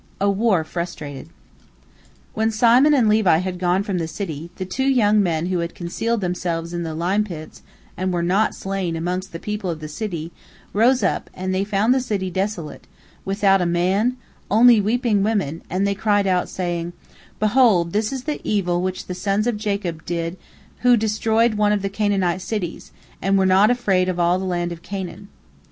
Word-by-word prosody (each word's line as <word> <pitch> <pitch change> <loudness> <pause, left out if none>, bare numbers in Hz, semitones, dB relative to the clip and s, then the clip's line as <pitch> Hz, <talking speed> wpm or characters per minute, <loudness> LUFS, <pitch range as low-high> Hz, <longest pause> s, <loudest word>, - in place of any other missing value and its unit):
A 200 0 +2
WAR 200 -4 +2
FRUSTRATED 155 -4 -6 1.0
When 220 +1 +1
Simon 245 +6 +5
and 245 -5 +3
Levi 210 -6 +4
had 180 +1 -3
gone 180 +2 +1
from 195 -3 -2
the 165 - -2
city, 165 -2 -6
the 185 - -4
two 265 +9 -2
young 215 -6 +4
men 165 -4 0
who 180 -1 -1
had 170 0 -4
concealed 220 +6 -2
themselves 175 -2 -2
in 175 - -2
the 160 -2 -4
lime 185 +6 +1
pits, 165 -6 -9 0.3
and 185 +1 -2
were 175 -1 -1
not 190 +5 +1
slain 195 -3 -3
amongst 180 +3 -3
the 165 - -6
people 210 +1 -4
of 165 -2 -3
the 155 - -6
city, 165 -1 -5 0.4
rose 245 +5 +3
up, - - 0
and 185 0 -3
they 190 +1 +1
found 210 +4 +2
the 265 - +1
city 200 -6 -2
desolate, 190 -4 -4 0.4
without 195 -1 +3
a 175 - +1
man, 190 +8 +1 0.3
only 230 +1 +6
weeping 220 0 +1
women, 195 -7 -1
and 185 +3 0
they 200 - +1
cried 205 0 +1
out, 185 -2 +1
saying, 175 -1 -3 0.5
"Behold, 215 -6 +3
this 210 +1 0
is 265 -2 -4
the 300 +1 -3
evil 180 -4 0
which 185 0 -3
the 180 - -5
sons 195 +3 0
of 240 -2 0
Jacob 200 -6 -3
did 170 0 -2 0.4
who 245 -1 +5
destroyed 220 +1 +1
one 210 -1 +2
of 205 -2 0
the 195 - -1
Canaanite 195 -3 0
cities, 185 -4 -4 0.3
and 195 +1 +2
were 190 - +3
not 190 +3 +5
afraid 195 -7 +1
of 180 -1 -2
all 175 +1 +3
the 190 - -4
land 175 -1 -1
of 170 -1 -7
Canaan." 190 +1 -6
190 Hz, 190 wpm, -21 LUFS, 175-215 Hz, 1.0 s, only